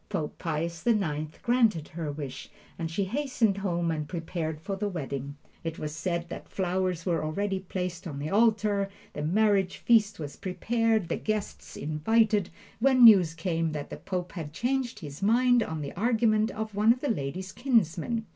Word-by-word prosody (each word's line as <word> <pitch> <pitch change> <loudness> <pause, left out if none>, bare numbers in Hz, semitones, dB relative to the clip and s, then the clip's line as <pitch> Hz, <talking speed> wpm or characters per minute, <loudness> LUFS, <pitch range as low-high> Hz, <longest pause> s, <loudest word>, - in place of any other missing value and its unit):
Pope 150 - -3
Pius 165 0 -2
the 235 -2 +3
Ninth 155 -6 -2
granted 230 -10 +2
her 160 -2 -4
wish, 140 -3 -7 0.3
and 165 -1 -2
she 175 +5 -1
hastened 225 -2 0
home 175 -3 0
and 155 -2 -3
prepared 165 -2 -3
for 195 +5 -4
the 205 +1 -2
wedding. 140 -5 -5 0.3
It 165 -1 -4
was 150 0 -5
said 170 0 -2
that - - -8
flowers 185 -2 -1
were 170 -4 0
already 195 +5 -1
placed 180 -1 -4
on 145 -4 -6
the 145 +2 -4
altar, 210 -2 +3 0.2
the 150 - -4
marriage 195 +3 +2
feast 210 -3 +3
was 145 -3 -7
prepared, 225 +1 0
the - - -1
guests 215 -2 -4
invited, 205 +7 +2 0.3
when 255 +1 +5
news 185 -8 +8
came 165 -1 -1
that 145 -1 -5
the - - -5
Pope 180 -2 -4
had 155 -5 -6
changed 245 0 -1
his 145 +1 -8
mind 245 +4 +4
on 160 -7 -3
the 140 - -5
argument 220 +1 +2
of 220 0 -5
one 210 +3 +4
of 250 +2 0
the 290 - -1
lady's 180 +3 -4
kinsmen. 225 - +1
185 Hz, 175 wpm, -28 LUFS, 160-220 Hz, 0.3 s, news